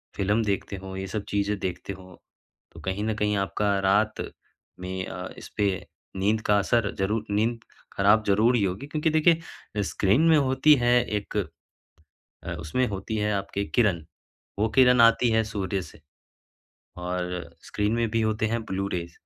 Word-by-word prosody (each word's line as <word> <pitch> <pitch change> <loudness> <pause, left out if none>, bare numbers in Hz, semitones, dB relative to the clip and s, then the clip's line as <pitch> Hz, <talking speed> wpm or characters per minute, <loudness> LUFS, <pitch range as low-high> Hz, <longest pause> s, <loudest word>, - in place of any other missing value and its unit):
Film 105 +4 +1
देखते 100 -1 -2
हो, 95 0 -8
ये 95 0 -4
सब 105 +1 -4
चीज़ें 100 0 0
देखते 95 +1 -4
हो, 95 -2 -14 0.5
तो - - -13
कहीं 95 +2 -3
न 110 - 0
कहीं 105 -1 0
आपका 100 +1 0
रात 100 +3 +2 0.6
में 95 0 -4
अ, - - -6
इसपे 100 -3 -2 0.3
नींद 105 +3 +1
का 105 -1 +3
असर 105 +1 +1
ज़रूर 105 +3 0
नींद 115 +3 +1 0.3
खराब 105 +3 +4
ज़रूर 110 +5 +4
ही 110 - +2
होगी 95 +9 -2
क्योंकि 155 +1 0
देखिए 160 -9 0
स्क्रीन 100 +6 +2
में 160 - +6
होती 135 +2 +4
है 120 0 +4 0.2
एक 105 - -4 1.1
अ, 85 - -4
उसमें 80 +12 0
होती 100 +2 -4
है 105 0 0
आपके 100 0 -2
किरण। 100 -8 +1 0.6
वो 110 - +3
किरण 125 0 +5
आती 115 +1 +5
है 110 0 +3
सूर्य 100 -3 -2
से, 80 - -13 1.0
और 90 0 -4
स्क्रीन 105 +1 -1
में 115 -1 +1
भी 115 +1 +1
होते 110 0 0
हैं 115 +1 -1
ब्लू-रेज़। 95 -4 -3
105 Hz, 160 wpm, -26 LUFS, 95-115 Hz, 1.1 s, में